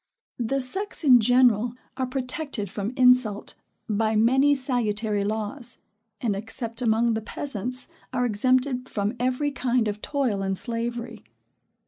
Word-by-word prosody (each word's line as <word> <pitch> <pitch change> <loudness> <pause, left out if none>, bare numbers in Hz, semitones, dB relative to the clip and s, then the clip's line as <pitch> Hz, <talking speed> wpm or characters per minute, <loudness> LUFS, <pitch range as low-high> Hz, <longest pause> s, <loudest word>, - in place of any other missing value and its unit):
The 245 +4 0
sex, 380 +10 -3
in 255 -5 +7
general, 245 0 +3 0.2
are 260 -1 -2
protected 255 - -3
from 205 +2 -3
insult, 250 -5 +3 0.3
by 220 +1 +1
many 265 +6 +4
salutary 220 -6 0
laws; 220 +4 -3 0.4
and, 215 -4 0
except 225 +3 -4
among 230 0 +2
the 220 - -2
peasants, 250 +1 -4 0.2
are 250 -1 0
exempted 255 +3 +1
from 205 +1 -1
every 255 +4 0
kind 250 -4 0
of 210 0 -4
toil 255 -9 -1
and 195 0 -1
slavery. 235 0 -4
240 Hz, 130 wpm, -25 LUFS, 215-255 Hz, 0.4 s, in